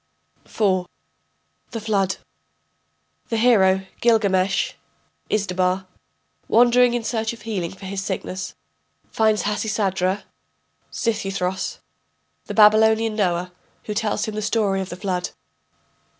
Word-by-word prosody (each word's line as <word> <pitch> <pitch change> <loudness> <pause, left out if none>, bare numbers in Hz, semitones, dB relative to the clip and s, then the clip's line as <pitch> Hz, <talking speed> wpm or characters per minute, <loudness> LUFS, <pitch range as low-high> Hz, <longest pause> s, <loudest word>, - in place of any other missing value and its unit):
] - - -40
IV. 185 -4 +1 0.8
THE 225 - -5
FLOOD 200 -3 0 1.1
[The 230 - 0
hero 190 -5 +4
Gilgamesh 195 -4 +2 0.6
(Izdubar), 185 -2 0 0.6
wandering 245 +1 +5
in 240 - -2
search 225 0 -1
of 225 -2 -13
healing 195 -7 -2
for 190 0 -11
his 195 0 -4
sickness, 190 -1 -4 0.6
finds 220 -1 +2
Hasisadra 200 -2 0 0.7
(Xisuthros), 195 -5 -2 0.7
the - - -5
Babylonian 220 +1 +5
Noah, 180 -3 0 0.3
who 210 - -4
tells 215 0 -1
him 215 - -5
the 215 - -3
story 205 -3 +1
of 190 - -5
the - - -5
Flood. 180 -1 -2
205 Hz, 110 wpm, -22 LUFS, 190-220 Hz, 1.1 s, wandering